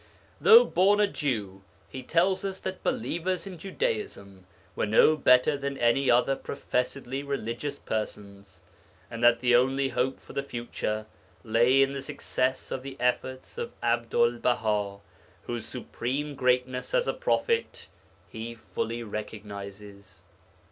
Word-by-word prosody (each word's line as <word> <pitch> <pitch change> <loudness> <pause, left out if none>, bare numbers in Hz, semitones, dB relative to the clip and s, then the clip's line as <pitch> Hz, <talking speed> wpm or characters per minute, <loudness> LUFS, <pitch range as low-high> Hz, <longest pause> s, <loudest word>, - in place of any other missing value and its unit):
Though 465 +2 +9
born 200 +3 +3
a 210 - +6
Jew, 105 - -3 0.3
he 130 - -7
tells 180 +8 +1
us 195 -1 -3
that 190 0 -5
believers 185 -7 -2
in 185 -4 -8
Judaism 195 - -4 0.3
were - - 0
no 110 +8 +5
better 125 0 +4
than 140 0 -4
any 120 +3 +2
other 125 +3 +4
professedly 135 0 -3
religious 140 0 -4
persons, 100 -5 -6 0.5
and 115 0 -5
that 120 0 +5
the 120 -1 +4
only 135 +2 +2
hope 130 +1 -1
for - - -14
the 140 - -1
future 120 -4 -4 0.4
lay 120 +4 +4
in 135 0 -1
the 140 - -4
success 130 -2 -2
of 130 - -3
the 135 0 -8
efforts 130 - -2
of 470 0 -4
Abdul 475 0 +2
Baha, 105 -4 0 0.4
whose 120 -1 -5
supreme 130 +4 -4
greatness 125 - 0
as - - +3
a - - +1
prophet 465 0 -1 0.4
he 115 +1 -7
fully 115 +1 -4
recognizes. 100 -2 -8
125 Hz, 135 wpm, -28 LUFS, 110-145 Hz, 0.5 s, Though